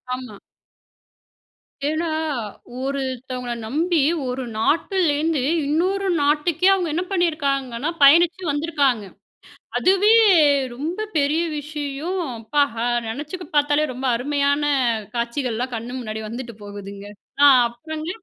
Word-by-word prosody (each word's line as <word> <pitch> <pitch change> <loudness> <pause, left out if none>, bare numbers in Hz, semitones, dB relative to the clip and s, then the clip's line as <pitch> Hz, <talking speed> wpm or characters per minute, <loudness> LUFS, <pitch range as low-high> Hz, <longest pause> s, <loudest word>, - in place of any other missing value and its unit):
ஆமா. 250 -5 -9 1.5
ஏன்னா, 320 +2 -1 0.7
ஒருத்தவங்கள 260 -2 -3
நம்பி, 325 +6 +1 0.3
ஒரு 255 +1 -3
நாட்டுலேருந்து, 315 - +1 0.3
இன்னொரு 375 +6 0
நாட்டுக்கே 300 +5 +2
அவுங்க 365 -4 0
என்ன 345 +3 0
பண்ணியிருக்காங்கன்னா, 280 -7 0
பயணிச்சு 340 +6 +5
வந்திருக்காங்க. 285 -7 0 0.7
அதுவே 390 +4 +4 0.6
ரொம்ப 320 - -4 0.2
பெரிய 295 +3 +2 0.2
விஷயம். 295 +4 -4 0.2
அப்பா! 285 +7 0 0.2
அ - - +1 0.2
நெனச்சு 295 +10 -5 0.2
பாத்தாலே, 290 +1 +3
ரொம்ப 255 +2 -6
அருமையான 285 +3 0 0.5
காட்சிகள்லாம் 240 +1 -2
கண்ணு 240 +3 -5
முன்னாடி 220 -2 -5
வந்துட்டு 235 0 -7
போகுதுங்க. 200 0 -9 0.4
ஆ - - +9 0.2
அப்புறங்க? 310 +7 -7
285 Hz, 100 wpm, -22 LUFS, 250-325 Hz, 1.5 s, ஆ